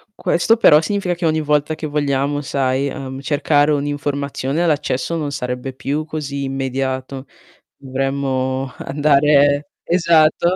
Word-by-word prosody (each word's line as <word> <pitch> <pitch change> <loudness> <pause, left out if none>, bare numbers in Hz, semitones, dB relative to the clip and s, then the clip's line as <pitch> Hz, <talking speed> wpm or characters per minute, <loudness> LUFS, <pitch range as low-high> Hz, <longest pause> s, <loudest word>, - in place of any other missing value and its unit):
questo 190 +5 +2
però 150 -9 +6
significa 190 +1 -1
che 175 0 -4
ogni 155 0 +1
volta 150 +1 0
che 155 - -6
vogliamo, 145 -1 -1
sai, 135 -1 0
ehm, 135 -2 -6
cercare 145 +1 +2
un'informazione, 145 +1 -2
l'accesso 150 0 -1
non 150 -3 -3
sarebbe 125 -1 -4
più 140 +4 -3
così 145 -3 -4
immediato. 135 0 -3 0.5
Dovremmo 135 -1 -2
andare 145 0 +3
esatto. 165 -2 +3
145 Hz, 120 wpm, -19 LUFS, 135-155 Hz, 0.5 s, però